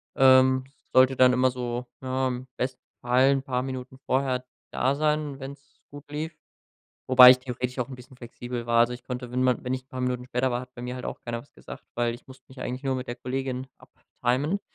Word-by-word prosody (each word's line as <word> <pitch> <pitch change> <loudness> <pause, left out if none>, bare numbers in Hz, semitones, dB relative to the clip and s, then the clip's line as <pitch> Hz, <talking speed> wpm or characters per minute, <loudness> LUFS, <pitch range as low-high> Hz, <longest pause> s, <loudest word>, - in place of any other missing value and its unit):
ähm, 130 0 +5 0.3
sollte 130 +1 +6
dann 125 0 +6
immer 130 +1 +3
so, 125 0 -4 0.2
ja, 130 0 -1
im 125 +1 -4
besten 130 0 -3 0.2
Fall 125 +3 +4
'n 135 -1 +1
paar 125 -2 -1
Minuten 130 0 -6
vorher 130 -1 0 0.3
da 130 +2 +1
sein, 150 -2 0
wenn's 140 +2 -11
gut 145 0 -12
lief 160 +2 -4 0.8
wobei 125 -1 +11
ich 130 - +6
theoretisch 125 0 -5
auch 125 - -1
'n 135 - -7
bisschen 125 +1 -15
flexibel 120 0 -6
war. 115 0 +3
Also, 120 +1 +3
ich 125 - -8
konnte, 125 -1 -6
wenn 125 - 0
ma 130 -1 +4
wenn 125 - -3
ich 130 0 -2
'n - - -47
paar 130 -1 -6
Minuten 125 0 -2
später 125 0 0
war, 120 - -1
hat 125 0 -12
bei 120 - -9
mir 125 0 -4
halt 125 - -6
auch - - -6
keiner 120 -1 -3
was 140 - -21
gesagt, - - -11
weil 120 -1 0
ich 120 - -14
musste 130 -1 -15
mich 130 0 -12
eigentlich 125 +2 -4
nur 135 -1 0
mit 125 - -5
der 120 - -4
Kollegin 130 +1 -3
abtimen. 140 +11 -2
130 Hz, 230 wpm, -26 LUFS, 125-130 Hz, 0.8 s, wobei